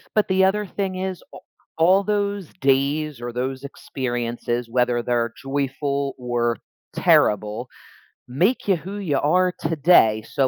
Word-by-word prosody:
But 215 -2 +2
the 190 0 +3
other 210 +2 +1
thing 190 0 -3
is, 185 -1 -4
a - - -9 0.4
all 185 +5 +4
those 205 -3 -2
days 140 +1 +1
or 120 0 -5
those 130 +2 -3
experiences, 120 -3 -4
whether 125 -1 +1
they're 115 -1 -1
joyful 140 0 -2
or 120 -1 -1 0.4
terrible, 105 +3 +2 0.6
make 180 - +1
ya 195 -4 +2
who 195 +5 -7
you 150 -8 0
are 180 +5 +2
today, 155 -9 +4
so 130 +4 0
140 Hz, 140 wpm, -22 LUFS, 120-185 Hz, 0.6 s, all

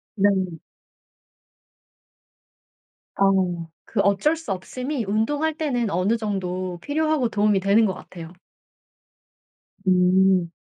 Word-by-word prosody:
네. 190 -5 +1 2.6
어. 185 -4 +2 0.2
그 220 - -4
어쩔 200 +11 +2
수 320 -9 -7
없음이 250 +7 -4
운동할 285 +10 0
때는 250 -8 -1
어느 190 +6 +1
정도 185 -4 -3
필요하고 305 - 0
도움이 210 -2 +2
되는 200 +4 +3
것 190 - 0
같아요. 170 -2 -11 1.5
음. 185 -1 +4
200 Hz, 180 characters per minute, -23 LUFS, 185-240 Hz, 2.6 s, 음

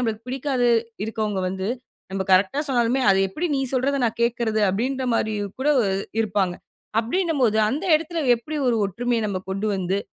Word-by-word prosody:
நம்பளுக்கு 225 -1 -3
பிடிக்காது 260 -2 +1 0.3
இருக்கறவங்க 215 -4 -2
வந்து 190 +2 -3 0.4
நம்ம 195 0 -1
கரெக்டா 195 +10 +3
சொன்னாலுமே, 245 +1 +2
அது 195 - +4
எப்டி 330 - -3
நீ - - 0
சொல்றத 275 +2 +1
நான் 225 - -4
கேக்குறது? 230 -2 0
அப்டின்ற 255 +6 -1
மாரியும் 205 -3 -2
கூட 290 - +1 0.5
இருப்பாங்க. 190 -4 0 0.5
அப்டின்னும்போது 255 - +1
அந்த 300 +10 -3
இடத்துல 325 0 -4
எப்டி 295 +6 -5
ஒரு 230 -2 +2
ஒற்றுமைய 235 +4 -1
நம்ப 185 -2 -3
கொண்டு 205 +2 -2
வந்து, 190 +1 -1
230 Hz, 155 wpm, -23 LUFS, 205-265 Hz, 0.5 s, அது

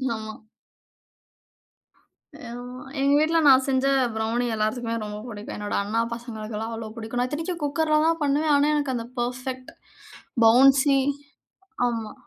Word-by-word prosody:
ஆமா. 215 0 -9 2.0
ஆமா. 245 +1 -8 0.2
எங்க 275 +1 +2
வீட்ல 325 +2 +3
நான் 265 -1 +6
செஞ்ச 265 0 +1 0.3
ப்ரௌணி 225 +2 -1
எல்லாத்துக்குமே 230 +2 -1
ரொம்ப 210 0 -6
பிடிக்கும். 210 -2 -7
என்னோட 205 0 -3
அண்ணா 225 +3 0
பசங்களுக்கெள்லாம் 225 -1 -6
அவ்ளோ 225 -1 -6
பிடிக்கும். 230 +2 -5
நான் 250 - -1
இத்தனைக்கும் 325 +4 -4
குக்கர்ல 305 +1 +1
தான் 330 0 +1
பண்ணுவேன் 295 +2 +2
ஆனா, 285 +1 +3
எனக்கு 285 -3 -1
அந்த 230 -1 -4
பெர்ஃபெக்ட், 255 +1 -4 0.7
பவுன்சி, 270 +4 +6 0.9
ஆமா. 225 -3 -4
245 Hz, 125 wpm, -24 LUFS, 225-280 Hz, 2.0 s, நான்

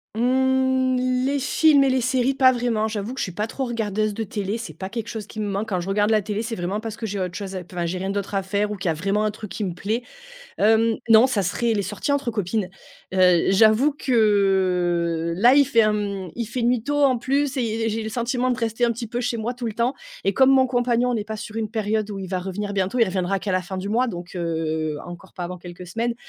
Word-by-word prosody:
Mmh, 260 +1 +2 0.3
les 280 +1 +1
films 285 +1 +4
et - - +3
les 260 0 +2
séries, 255 +2 +1
pas 265 -1 +5
vraiment. 235 -3 0
J'avoue 215 +2 -4
que 265 - -7
je - - +1
suis 185 - -4
pas 210 +5 -3
trop 270 - -4
regardeuse 215 -3 -1
de 225 +2 -3
télé. 205 +1 -3
C'est 220 -9 -7
pas 190 +5 -7
quelque 230 +1 -5
chose 220 -3 -5
qui 215 - -9
me 210 - -1
manque. 200 +2 -2
Quand 185 -3 0
je 175 - -5
regarde 205 +2 +1
la 215 -1 +3
télé, 210 +1 -3
c'est 230 0 -4
vraiment 185 +4 -2
parce 225 0 -6
que 225 - -5
j'ai 205 -1 -3
autre 180 -1 -3
chose 195 -2 -5
à 185 - -4
p 180 - -18
enfin, 175 -1 -2
j'ai 180 +2 -2
rien 190 +1 -3
d'autre 200 0 -3
à 195 - 0
faire 205 +2 -1
ou - - -2
qu'il 180 -2 -2
y - - +3
a - - 0
vraiment 195 +6 0
un 215 - +1
truc 215 -1 -9
qui 215 - -4
me 180 -4 -2
plaît, 220 +7 -2 0.5
hem, 225 +1 +3
non, 225 +3 +7
ça 210 -7 0
serait 230 +6 0
les 205 - 0
sorties 210 +9 -3
entre 280 -4 0
copines, 205 -2 -2 0.4
heu, 180 -2 +4
j'avoue 220 +8 +5
que, 185 - +1
là, 240 +5 +6
il 285 +1 +6
fait 230 -4 +4
un, 215 0 +2
mmh, 200 -4 -3
il 235 - -2
fait 240 +1 -3
nuit 240 -1 +2
tôt, 290 +3 0
en 260 -3 +3
plus 275 +3 0
et 225 -2 -1
j'ai 225 +1 -2
le 220 - -4
sentiment 245 +2 -1
de 245 - 0
rester 230 0 -2
un 235 - +4
petit 235 +1 -5
peu 240 +3 -3
chez 245 -1 -1
moi 230 +3 -2
tout 240 -1 -5
le 215 - -4
temps 235 +4 0 0.3
et 195 - +1
comme 265 +5 +5
mon 265 -1 +5
compagnon 245 -1 +1
n'est 215 -3 -1
pas 220 0 -6
sur 215 +1 -8
une 220 -1 -2
période 215 -1 -1
où 200 - -5
il 190 - -5
va 185 0 -2
revenir 200 +2 -4
bientôt, 195 +5 -1
il 230 - +6
reviendra 185 +1 -1
qu'à 195 - -3
la 185 0 +1
fin 190 +1 -6
du 190 +2 -4
mois, 245 +4 +2
donc, 175 -5 -6
heu, 160 -2 -2
encore 175 +1 -11
pas 180 - -5
avant 180 +1 -5
quelques 175 +1 -10
semaines, 230 +6 -2
215 Hz, 270 wpm, -23 LUFS, 190-240 Hz, 0.5 s, non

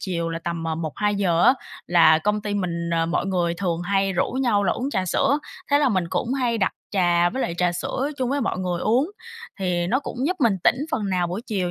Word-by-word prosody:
chiều 170 -3 -2
là 165 - -3
tầm, 170 -1 -3
à, 160 - -1
1:00-2:00 175 +2 0
á 260 - +6 0.3
là 160 -2 +6
công 210 +4 0
ty 205 0 -3
mình, 170 -3 -2
ờ, 165 0 +1
mọi 175 +3 -1
người 175 -3 0
thường 175 -2 -2
hay 195 +1 +1
rủ 175 - 0
nhau 240 -6 +1
là 175 - +2
uống 265 +3 -3
trà 185 -6 -1
sữa. 280 - +2 0.3
Thế 285 - +5
là 285 -3 +3
mình 185 -6 +1
cũng 245 +3 -1
hay 240 -4 0
đặt 190 - +1 0.2
trà 175 -3 +3
với 265 - -2
lại 170 - -2
trà 180 -1 +2
sữa 260 +10 -2
chung 255 0 -1
với 285 0 0
mọi 225 - -1
người 180 -2 -2
uống, 255 - +2 0.5
thì 175 -2 0
nó 255 +8 +2
cũng 275 - -7
giúp 365 +2 0
mình 215 -6 +3
tỉnh - - +5
phần 210 -10 -1
nào 180 -1 +1
buổi 185 +6 -4
chiều 185 -5 -1
190 Hz, 240 wpm, -23 LUFS, 175-230 Hz, 0.5 s, á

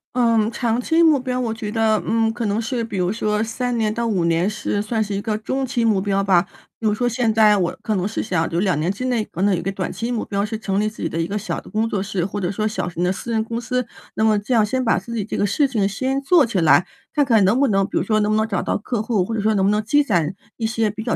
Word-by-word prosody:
嗯， 230 -3 +3
长 235 +1 -1
期 325 +6 +3
目 310 -4 +5
标， 255 0 -2
我 230 -3 -1
觉 215 -2 -5
得， 220 -1 +2
嗯， 225 0 +1
可 235 0 -3
能 205 +2 0
是 235 +1 -2
比 225 -3 -5
如 180 +1 +1
说 210 -1 0
3 245 +2 -2
年 215 -1 0
到 235 +1 -1
5 190 -6 0
年 170 +3 +2
是 205 -1 -2
算 220 +1 -1
是 205 -1 -5
一 200 - -2
个 215 0 -2
中 260 +5 -2
期 240 -2 -1
目 210 -4 +2
标 195 0 0
吧。 185 -3 +3 0.3
比 225 - -6
如 210 - +3
说 245 +3 0
现 230 -1 0
在 215 -1 +5
我 175 -3 -1
可 215 - -1
能 190 0 0
是 215 - -3
想 165 -5 0
就 170 - -1
2 185 -5 +1
年 165 +4 0
之 225 +6 -5
内， 240 -4 0
可 170 - -7
能 200 0 +3
有 175 - 0
一 - - -6
个 195 - -1
短 190 -1 -4
期 230 +2 -4
目 235 - -1
标 200 0 -1
是 220 +1 -4
成 195 -2 -1
立 210 - +1
自 215 - -12
己 - - -1
的 165 - -3
一 165 - +1
个 200 - -4
小 210 +1 -3
的 - - -14
工 220 +1 0
作 200 - -1
室 195 -3 -2
或 200 +3 -3
者 180 -2 -1
说 215 +2 -1
小 215 -4 -3
型 175 0 -3
的 180 - +2
私 195 +5 -5
人 220 -1 +1
公 230 +1 -4
司。 250 0 -2 0.3
那 220 - -1
么 215 -1 +4
这 205 +5 -2
样 225 -3 +5
先 255 +5 -1
把 225 - +3
自 235 +5 -7
己 220 - -1
这 - - -4
个 - - +2
事 275 +8 +2
情 210 -6 0
先 265 +7 -1
做 310 +1 +4
起 220 -5 -1
来， 155 0 +5 0.3
看 290 -2 +3
看 225 -6 +4
能 205 +7 +3
不 280 - +4
能 195 -2 +2
比 - - -3
如 - - +1
说 215 -1 +1
能 210 0 +1
不 - - +2
能 220 +1 +1
找 200 -4 -1
到 - - -1
客 215 +2 -3
户？ 215 -4 0
或 225 - -4
者 215 - -1
说 215 +1 +2
能 190 -1 +2
不 200 - +3
能 210 0 +1
积 290 +7 +3
攒 175 - 0 0.2
一 225 - -1
些 220 -1 0
比 220 +1 -7
较 235 - 0
215 Hz, 330 characters per minute, -21 LUFS, 200-235 Hz, 0.3 s, 目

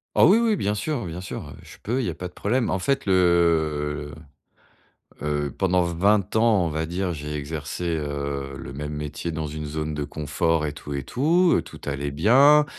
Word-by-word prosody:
Oh - - +7
oui 220 +4 +6
oui, 225 -4 +2
bien 105 +1 0
sûr 120 0 -2
bien 85 +2 -6
sûr, 95 - -6
heu, - - -10
je - - -13
peux, 125 +5 -1
il - - -2
y - - -1
a - - -3
pas 90 +2 -6
de 90 - -15
problème. 120 +3 0
En 95 - 0
fait 135 +4 0
le, 80 -5 +2 1.1
heu, 75 -1 -2
pendant 90 -2 +3
20 95 +4 +1
ans, 110 -5 +4
on 80 - -1
va 80 +1 -2
dire, 90 +1 -2
j'ai 75 -1 -5
exercé, 75 +3 -4
heu, 70 -2 -4
le - - -8
même 75 +2 -5
métier 75 +3 -4
dans 80 -1 -3
une 75 0 -5
zone 75 +1 -3
de 75 -1 -3
confort 75 +2 0
et 75 - -2
tout 75 0 -7
et 70 - -2
tout, 170 - +3
heu, - - +2
tout - - -12
allait 70 0 -3
bien. 135 - +6
80 Hz, 210 wpm, -24 LUFS, 75-100 Hz, 1.1 s, Oh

